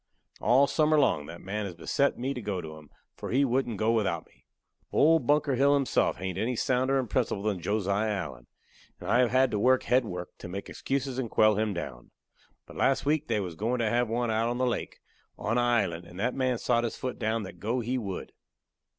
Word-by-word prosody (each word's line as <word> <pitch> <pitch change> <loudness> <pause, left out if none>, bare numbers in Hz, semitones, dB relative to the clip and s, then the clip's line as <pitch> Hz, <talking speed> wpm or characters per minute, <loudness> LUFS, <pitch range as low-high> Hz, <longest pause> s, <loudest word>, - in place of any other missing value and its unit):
All 125 +5 +4
summer 155 +1 +2
long 75 - +2
that 85 +1 -9
man 105 +2 -3
has 90 - -8
beset 140 +11 0
me 130 +3 -2
to 125 - -6
go 100 -3 -3
to 80 -2 -7
'em, 75 -2 -14 0.3
for - - -7
he 135 +4 +3
wouldn't 125 -3 0
go 110 +3 +2
without 100 -8 0
me. - - -29 0.4
Old 160 +2 +4
Bunker 145 -1 +3
Hill 140 +3 +4
himself 135 -3 +1
hain't 95 -1 -4
any 120 +3 0
sounder 130 +3 +1
in 130 - -1
principle 110 -3 -1
than 105 -4 -1
Josiah 100 +3 0
Allen, 75 - -4 0.5
and - - -8
I 120 - +4
have 125 -2 +4
had 130 0 +3
to 105 - 0
work 130 +4 +4
head 125 +1 +3
work 90 -5 -7
to - - -7
make 95 +2 -6
excuses 135 -1 -2
and 120 -3 -2
quell 110 0 +4
him 110 +1 0
down. 65 -8 -6 0.6
But - - -13
last 135 +1 +2
week 150 +1 +1
they 115 -2 +1
was 90 -4 -4
goin' 115 +9 -1
to 115 -3 0
have 120 -1 +1
one 120 0 0
out 115 +1 +1
on 120 - -2
the 130 - +1
lake, 120 - -2 0.4
on 115 +3 0
a - - +3
island, 100 -9 0
and 90 - -11
that 125 +4 0
man 130 -2 0
sot 120 0 +1
his 115 - -3
foot 130 -1 -4
down 110 -1 0
that 90 -3 -10
go 115 +7 -1
he 125 +3 -1
would. 100 -5 -5
115 Hz, 230 wpm, -28 LUFS, 100-130 Hz, 0.6 s, All